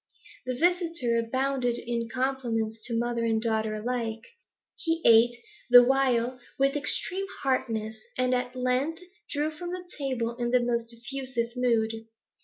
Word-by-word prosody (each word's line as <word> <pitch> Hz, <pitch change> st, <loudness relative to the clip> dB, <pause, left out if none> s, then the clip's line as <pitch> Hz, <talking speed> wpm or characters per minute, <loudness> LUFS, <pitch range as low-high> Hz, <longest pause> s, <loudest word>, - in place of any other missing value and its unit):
The 255 Hz, -, -1 dB
visitor 335 Hz, -7 st, +1 dB
abounded 255 Hz, +1 st, 0 dB
in 235 Hz, -1 st, -3 dB
compliments 240 Hz, -4 st, -1 dB
to 230 Hz, -2 st, -1 dB
mother 235 Hz, 0 st, -1 dB
and 225 Hz, -1 st, +2 dB
daughter 220 Hz, -1 st, 0 dB
alike. 225 Hz, 0 st, -3 dB, 0.5 s
He 330 Hz, 0 st, -1 dB
ate, 230 Hz, +1 st, +6 dB, 0.3 s
the 245 Hz, 0 st, +10 dB
while, 255 Hz, -1 st, +2 dB, 0.2 s
with 275 Hz, +1 st, +2 dB
extreme 365 Hz, +6 st, 0 dB, 0.2 s
heartiness, 220 Hz, -5 st, -1 dB, 0.2 s
and 255 Hz, 0 st, +2 dB
at 250 Hz, 0 st, -1 dB
length 255 Hz, +7 st, 0 dB, 0.3 s
drew 300 Hz, +2 st, -1 dB
from 345 Hz, +3 st, -7 dB
the 360 Hz, 0 st, -6 dB
table 245 Hz, -4 st, -2 dB
in 240 Hz, -1 st, -1 dB
the 250 Hz, +1 st, +4 dB
most 235 Hz, -1 st, -1 dB
effusive 240 Hz, 0 st, -4 dB
mood. 225 Hz, -2 st, 0 dB
245 Hz, 140 wpm, -28 LUFS, 230-270 Hz, 0.5 s, the